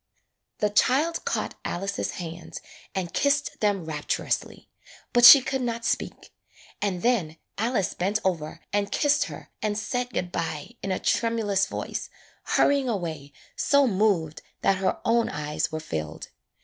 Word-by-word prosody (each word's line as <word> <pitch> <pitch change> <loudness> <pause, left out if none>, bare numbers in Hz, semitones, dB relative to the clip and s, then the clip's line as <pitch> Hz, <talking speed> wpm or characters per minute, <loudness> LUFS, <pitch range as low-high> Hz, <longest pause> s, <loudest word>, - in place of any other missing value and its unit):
The 210 -1 0
child 295 +10 +2
caught - - -2
Alice's 195 +3 -3
hands 170 -1 -7 0.4
and 180 -3 -3
kissed 285 +1 +1
them 200 -5 +1
rapturously, 150 -2 -3 0.5
but 240 -1 +4
she 265 +3 +12
could 265 0 -2
not 235 -1 -3
speak, - - -3 0.5
and 190 -4 -1
then 185 -11 +1 0.2
Alice 225 -4 0
bent 195 +4 0
over 165 -3 -2
and 205 -1 0
kissed 290 -1 +2
her - - -10
and 210 -1 -1
said 245 +3 -2
good 180 -7 -3
by 160 +1 -4
in 195 - -3
a 185 - +1
tremulous 210 -4 +1
voice, - - -5 0.4
hurrying 280 -2 +2
away 160 -9 -4 0.2
so 280 -1 +3
moved 190 - +1 0.2
that 195 - +3
her 190 - 0
own 230 0 +3
eyes 150 +2 -2
were 155 - -3
filled. 80 - -5
200 Hz, 145 wpm, -26 LUFS, 170-240 Hz, 0.5 s, she